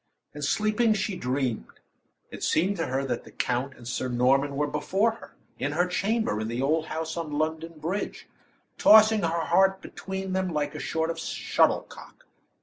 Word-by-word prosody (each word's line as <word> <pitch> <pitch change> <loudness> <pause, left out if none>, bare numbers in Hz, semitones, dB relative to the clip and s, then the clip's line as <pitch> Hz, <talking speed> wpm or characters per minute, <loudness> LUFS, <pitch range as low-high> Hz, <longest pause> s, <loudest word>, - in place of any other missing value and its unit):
And 150 0 -7
sleeping, 215 +7 +2
she 195 -1 -2
dreamed. 125 - -3 0.5
It - - -9
seemed 185 +5 +2
to 165 - -1
her 135 +2 -1
that 120 -3 -3
the - - -14
count 130 +2 -2
and 120 - -11
Sir 125 +1 -2
Norman 135 +3 +2
were 150 +1 +1
before 195 +9 +1
her, 225 - -13 0.2
in 145 +1 -1
her 175 +3 +2
chamber 200 - 0
in 110 - -3
the 120 +2 -3
old 155 +4 +1
house 160 0 -4
on 160 -3 -4
London 160 +2 -2
Bridge, 170 +7 -4 0.5
tossing 215 0 +7
her 165 - +1 0.2
heart 190 +2 +3
between 190 0 -6
them 190 0 0
like 150 -2 -1
a - - -6
sort 160 +3 -1
of - - -7
shuttlecock. - - -1
160 Hz, 175 wpm, -27 LUFS, 135-190 Hz, 0.5 s, tossing